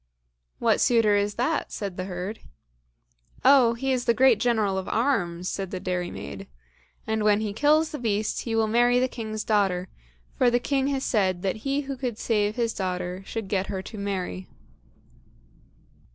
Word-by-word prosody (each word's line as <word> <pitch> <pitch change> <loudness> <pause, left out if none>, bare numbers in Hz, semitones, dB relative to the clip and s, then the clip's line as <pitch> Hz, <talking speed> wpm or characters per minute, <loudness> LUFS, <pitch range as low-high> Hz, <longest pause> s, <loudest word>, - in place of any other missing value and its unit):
"What - - +2
suitor 225 -4 +4
is 205 0 0
that?" 285 +6 -1
said 200 -3 -5
the 185 - -4
herd. 185 +3 -5 1.1
"Oh, 255 -4 +6
he 265 +3 -1
is 250 -2 -1
a 235 - +5
great 255 -3 +5
General 215 -5 +1
of 190 - -6
arms," 180 -9 0
said 195 -1 -3
the 185 - -4
dairymaid, 180 - -4 0.6
"and 220 -1 -1
when 210 0 +3
he 210 -2 -2
kills 300 +7 +3
the 300 - -5
beast, 215 -3 -1
he 230 -2 -3
will 225 0 +3
marry 240 +3 +3
the 255 - +2
king's 220 -3 -5
daughter, 190 -4 +1 0.5
for 250 - +5
the 240 - +3
king 270 +1 0
has 275 -1 -1
said 185 -5 +1
that 195 +2 -1
he 275 +5 -1
who 275 -1 -5
could 245 -4 -4
save 210 -2 0
his 230 -2 0
daughter 180 -1 -3
should 225 -3 -4
get 190 -1 -1
her 190 -2 -4
to 215 - -9
marry." 185 - -4
215 Hz, 175 wpm, -26 LUFS, 190-245 Hz, 1.1 s, Oh